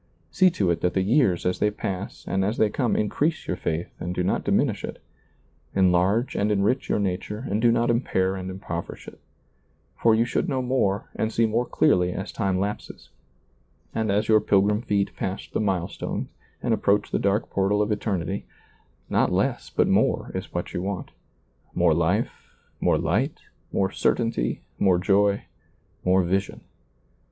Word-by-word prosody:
See 185 Hz, -1 st, +5 dB
to 95 Hz, -4 st, +2 dB
it 85 Hz, -, -1 dB
that 90 Hz, -, 0 dB
the 95 Hz, -, +2 dB
years 105 Hz, -, +2 dB
as 90 Hz, -, 0 dB
they 105 Hz, -, +3 dB
pass 100 Hz, -2 st, -5 dB
and 95 Hz, 0 st, 0 dB
as 105 Hz, +4 st, -1 dB
they 105 Hz, -2 st, +3 dB
come 125 Hz, -2 st, 0 dB
increase 150 Hz, +9 st, 0 dB
your -, -, -2 dB
faith 85 Hz, -1 st, -3 dB
and 90 Hz, +1 st, -4 dB
do 90 Hz, -, 0 dB
not -, -, 0 dB
diminish -, -, +1 dB
it; -, -, -6 dB, 0.8 s
enlarge 95 Hz, +5 st, +2 dB
and 105 Hz, +1 st, +1 dB
enrich 105 Hz, +6 st, +1 dB
your -, -, +2 dB
nature 100 Hz, +4 st, -3 dB
and 105 Hz, +2 st, -1 dB
do 120 Hz, 0 st, +5 dB
not 120 Hz, +1 st, +2 dB
impair 95 Hz, -6 st, 0 dB
and 95 Hz, -1 st, -5 dB
impoverish 90 Hz, -3 st, -6 dB
it -, -, -11 dB, 0.8 s
For 115 Hz, -1 st, +5 dB
you 115 Hz, +1 st, +3 dB
should 120 Hz, -, -1 dB
know 130 Hz, -3 st, 0 dB
more 115 Hz, -6 st, 0 dB
and 110 Hz, -, -1 dB
see 115 Hz, -, +2 dB
more 115 Hz, +3 st, 0 dB
clearly 90 Hz, 0 st, +2 dB
as 95 Hz, -, -5 dB
time 95 Hz, -2 st, 0 dB
lapses, 100 Hz, +2 st, -5 dB, 0.8 s
and 110 Hz, -2 st, 0 dB
as 105 Hz, +2 st, +1 dB
your 110 Hz, -1 st, +6 dB
pilgrim 105 Hz, +1 st, +2 dB
feet 100 Hz, -4 st, -1 dB
pass 95 Hz, +1 st, -4 dB
the -, -, -3 dB
milestones 95 Hz, -4 st, -2 dB, 0.3 s
and -, -, +2 dB
approach 100 Hz, +1 st, +1 dB
the -, -, +1 dB
dark 100 Hz, +2 st, 0 dB
portal 100 Hz, +1 st, +1 dB
of 105 Hz, +1 st, +1 dB
eternity; 100 Hz, -3 st, -2 dB, 0.6 s
not -, -, +2 dB
less, -, -, 0 dB
but -, -, +2 dB
more -, -, +2 dB
is -, -, -5 dB
what 85 Hz, -, -4 dB
you 90 Hz, -, -2 dB
want; 95 Hz, 0 st, -4 dB, 0.6 s
more 85 Hz, -2 st, +4 dB
life, 85 Hz, +7 st, -1 dB, 0.3 s
more -, -, +3 dB
light, -, -, 0 dB, 0.3 s
more 95 Hz, 0 st, +1 dB
certainty, 115 Hz, -, 0 dB, 0.2 s
more 95 Hz, -2 st, +4 dB
joy, 100 Hz, +2 st, +2 dB, 0.6 s
more 95 Hz, 0 st, +3 dB
vision. 95 Hz, +3 st, -1 dB
100 Hz, 170 wpm, -25 LUFS, 95-110 Hz, 0.8 s, your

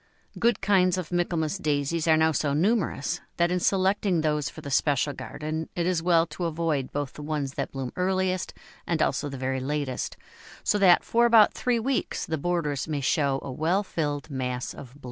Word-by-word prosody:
Good 235 Hz, +1 st, +2 dB
kinds 185 Hz, -3 st, +3 dB
of 180 Hz, -2 st, -5 dB
Michaelmas 175 Hz, 0 st, 0 dB
Daisies 155 Hz, 0 st, 0 dB
are 160 Hz, -1 st, +5 dB
now 160 Hz, 0 st, +4 dB
so 145 Hz, -2 st, 0 dB
numerous 175 Hz, -, 0 dB, 0.2 s
that 170 Hz, 0 st, +2 dB
in 180 Hz, -, +1 dB
selecting 190 Hz, -1 st, +2 dB
those 150 Hz, -2 st, 0 dB
for -, -, -11 dB
the 140 Hz, -, -7 dB
special 145 Hz, 0 st, +2 dB
garden 155 Hz, +3 st, -5 dB
it 170 Hz, -, 0 dB
is 180 Hz, -2 st, +1 dB
well 165 Hz, -1 st, +4 dB
to 170 Hz, +2 st, -5 dB
avoid 160 Hz, -5 st, -1 dB
both 145 Hz, -2 st, -3 dB
the -, -, -9 dB
ones 145 Hz, -2 st, -3 dB
that -, -, -3 dB
bloom 135 Hz, -2 st, -5 dB
earliest 185 Hz, 0 st, 0 dB, 0.4 s
and 170 Hz, -2 st, 0 dB
also 150 Hz, -1 st, 0 dB
the 135 Hz, -, -6 dB
very 130 Hz, 0 st, -2 dB
latest, 140 Hz, -1 st, -3 dB, 0.5 s
so 210 Hz, -, +2 dB
that 185 Hz, -3 st, +6 dB
for 235 Hz, +1 st, +3 dB
about 225 Hz, -3 st, +6 dB
three 250 Hz, -1 st, 0 dB
weeks 250 Hz, +3 st, -1 dB
the 160 Hz, -2 st, -3 dB
borders 150 Hz, -4 st, -1 dB
may 150 Hz, -3 st, -2 dB
show 140 Hz, 0 st, +1 dB
a 135 Hz, -, -5 dB
well 170 Hz, +9 st, +1 dB
filled 145 Hz, -6 st, -3 dB
mass 125 Hz, -2 st, -3 dB
of 130 Hz, -3 st, -11 dB
bloom. -, -, -17 dB
160 Hz, 195 wpm, -26 LUFS, 145-180 Hz, 0.5 s, that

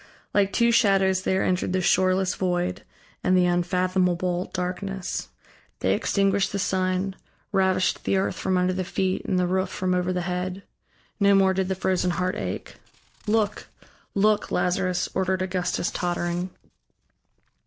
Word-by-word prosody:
Like 200 Hz, -1 st, +3 dB
two 235 Hz, 0 st, +3 dB
shadows 195 Hz, -4 st, +3 dB
there 190 Hz, 0 st, +1 dB
entered 180 Hz, 0 st, 0 dB
the 185 Hz, -, +2 dB
shoreless 185 Hz, +1 st, +2 dB
void 180 Hz, 0 st, -1 dB, 0.4 s
and 185 Hz, 0 st, +3 dB
the 180 Hz, -, +4 dB
unfathomable 180 Hz, 0 st, +1 dB
darkness; 185 Hz, +1 st, -4 dB, 0.5 s
they -, -, +2 dB
extinguished 195 Hz, 0 st, +1 dB
the 200 Hz, -, -2 dB
sun, 185 Hz, 0 st, 0 dB, 0.4 s
ravished 190 Hz, -1 st, +1 dB
the 195 Hz, -, +1 dB
earth 190 Hz, -, 0 dB
from 185 Hz, -1 st, 0 dB
under 180 Hz, 0 st, +2 dB
the 185 Hz, 0 st, -2 dB
feet, 185 Hz, +1 st, -1 dB
and 185 Hz, -, 0 dB
the 180 Hz, -, +2 dB
roof 185 Hz, +1 st, 0 dB
from 185 Hz, -1 st, -1 dB
over 180 Hz, 0 st, 0 dB
the 180 Hz, -1 st, -1 dB
head. 180 Hz, +2 st, -3 dB, 0.6 s
No 200 Hz, -1 st, +5 dB
more 190 Hz, -1 st, +4 dB
did 190 Hz, 0 st, 0 dB
the 190 Hz, -, -1 dB
frozen 185 Hz, -1 st, 0 dB
heart 180 Hz, +1 st, 0 dB
ache. -, -, -5 dB, 0.5 s
"Look, 210 Hz, -1 st, 0 dB, 0.5 s
look, 210 Hz, +1 st, +2 dB
Lazarus," 180 Hz, 0 st, 0 dB
ordered 190 Hz, 0 st, 0 dB
Augustus 185 Hz, -1 st, -1 dB
tottering. 175 Hz, 0 st, -2 dB
185 Hz, 145 wpm, -25 LUFS, 180-190 Hz, 0.6 s, No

